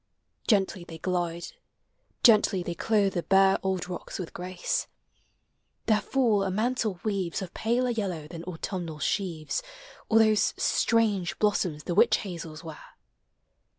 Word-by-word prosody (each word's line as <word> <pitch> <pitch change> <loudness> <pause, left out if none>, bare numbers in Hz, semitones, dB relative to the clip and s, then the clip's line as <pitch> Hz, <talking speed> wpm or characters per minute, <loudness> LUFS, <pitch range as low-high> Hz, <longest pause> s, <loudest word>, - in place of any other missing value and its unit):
Gently 195 -4 +2
they 165 -2 -10
glide, 175 -1 -2 0.8
gently 210 -5 +5
they 175 - -3
clothe 200 +1 +1
the 175 - -1
bare 195 +1 +4
Old 190 -2 -1
rocks 180 -1 -6
with 180 -4 -6
grace. 180 0 -2 1.0
Their 215 -1 +3
fall 235 -7 +2
a 195 - 0
mantle 215 -1 -1
weaves 195 -6 -1
Of 185 - -9
paler 245 +3 0
yellow 185 -9 -3
than 165 +1 -8
autumnal 175 -2 -5
sheaves 165 - -2 0.5
Or 225 - +4
those 215 -1 +4
strange 210 -6 +1
blossoms 180 -7 0
the 175 - -2
witch 210 +6 +5
hazels 165 -5 -7
wear. 160 -2 -9
190 Hz, 135 wpm, -27 LUFS, 175-215 Hz, 1.0 s, gently